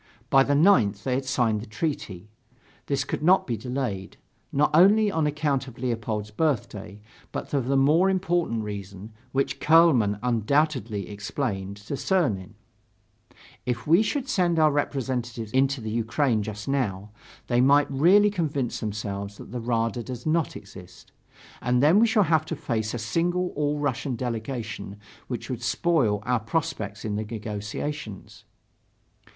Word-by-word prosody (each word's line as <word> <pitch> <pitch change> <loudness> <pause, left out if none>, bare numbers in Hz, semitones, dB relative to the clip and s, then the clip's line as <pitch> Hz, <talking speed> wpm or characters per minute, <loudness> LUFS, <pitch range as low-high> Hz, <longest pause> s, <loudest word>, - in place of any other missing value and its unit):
By 135 - +7
the 140 +1 +2
9th, 120 - +4
they 130 - -1
had 130 - +1
to 130 - -7
sign 120 -4 +1
the 110 - -8
treaty. 110 - -4 0.6
This 140 -2 0
could 145 - -4
not 180 +5 +4
be 120 - -2
delayed, 115 -5 -4 0.3
not 145 +2 +2
only 205 +6 +6
on 160 -4 +1
account 145 -3 -1
of 125 - -11
Leopold's 115 -4 -3
birthday, 105 -6 -2 0.3
but - - -4
for 140 - +1
a 135 +2 0
more 155 +8 +4
important 175 - 0
reason, 100 0 -7 0.2
which 135 +1 -1
Kuehlmann 150 -11 +5
undoubtedly 120 - 0
explained 100 -2 -4
to 105 +6 -8
Czernin: 115 - 0 1.1
"If 125 0 -3
we 170 +6 +5
should 270 +4 -1
send 180 -9 +1
our 155 -1 +5
representatives 125 -6 -2
into 135 +1 +2
the 110 -1 -4
Ukraine 115 +1 +1
just 105 0 -6
now, 105 -7 -1 0.3
they 120 0 +2
might 140 +2 +5
really 190 +9 +5
convince 145 - -2
themselves 100 -1 -4
that - - -11
the 125 -1 -4
Rada 115 0 -1
does 125 0 -7
not 160 0 0
exist; - - -12 0.5
and 125 +1 +2
then 165 +7 +6
we 230 - +5
shall 220 -2 +3
have 160 -2 +2
to 165 - -4
face 110 -5 -2
a - - -2
single 175 +10 0
All 150 -1 -1
Russian 140 -2 -2
delegation 115 -3 -5 0.3
which 120 - -5
would 125 - -4
spoil 120 -12 +1
our 125 -1 +1
prospects 110 - -3
in 105 -1 -2
the 110 - -2
negotiations."... 110 +3 -6
125 Hz, 155 wpm, -25 LUFS, 110-150 Hz, 1.1 s, By